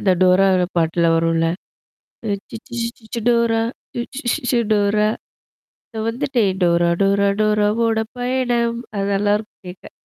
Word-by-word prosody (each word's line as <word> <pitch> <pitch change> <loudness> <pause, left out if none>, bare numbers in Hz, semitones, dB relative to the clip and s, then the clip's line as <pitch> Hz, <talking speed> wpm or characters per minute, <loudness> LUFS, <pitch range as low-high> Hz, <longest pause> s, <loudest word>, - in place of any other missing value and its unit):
அந்த 190 - +2
டோரா 185 +1 +5 0.3
பாட்டுல 165 +1 +1
வரும்ல. 165 0 +1 1.1
சிச்சீ 235 +2 -9
சீச்சீச்சி 230 0 -6
டோரா! 235 -1 +2 0.3
சீச்சீ 250 +4 -5
சீச்சீ - - -3
சு 240 - +3
டோரா! 210 0 +2 0.9
இத 220 - -4
வந்துட்டு 250 -1 0 0.2
டோரா 170 -1 +3
டோரா 200 0 +3
டோராவோட 215 +1 +2
பயணம். 245 -2 0 0.2
அத 195 - -1
நல்லாருக்கும் 205 +1 -1
கேக்க. 180 +1 -11
215 Hz, 120 wpm, -20 LUFS, 195-235 Hz, 1.1 s, டோரா